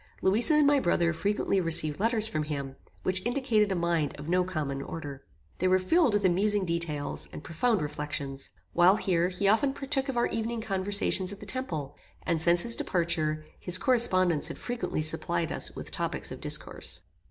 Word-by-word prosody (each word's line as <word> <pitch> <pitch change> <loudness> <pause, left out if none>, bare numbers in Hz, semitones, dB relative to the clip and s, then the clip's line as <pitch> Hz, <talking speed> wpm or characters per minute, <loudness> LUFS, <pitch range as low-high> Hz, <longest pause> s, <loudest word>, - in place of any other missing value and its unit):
Louisa 225 - +4
and 300 -1 +4
my 285 0 +4
brother 170 -4 +1
frequently 200 +2 0
received 160 -3 +4
letters 225 0 +1
from 180 -9 -2
him, 140 -3 -5 0.3
which 185 0 0
indicated 240 -5 +1
a - - 0
mind 170 -4 0
of 145 +1 -9
no 180 +2 +2
common 150 -7 -3
order. 140 -2 -7 0.4
They 185 - +1
were 185 0 +4
filled 265 - +2
with 205 -1 +1
amusing 200 +2 +2
details, 165 -4 -3
and - - -9
profound 205 +3 0
reflections. 145 -2 -5 0.2
While 175 +3 +5
here, 175 -4 +1
he 190 +2 -1
often 270 +7 +3
partook 275 -1 -1
of 260 - -3
our 240 - +3
evening 230 +1 -3
conversations 195 -2 0
at 200 - -9
the - - -9
temple; 155 - -5 0.3
and 165 -2 0
since 170 +1 +4
his 235 0 +5
departure, 155 -3 -1
his 180 0 +5
correspondence 185 - +3
had - - -7
frequently 240 -10 -3
supplied 165 +1 0
us - - -2
with - - -6
topics - - -3
of - - -8
discourse. 85 - -3
185 Hz, 180 wpm, -28 LUFS, 160-220 Hz, 0.4 s, While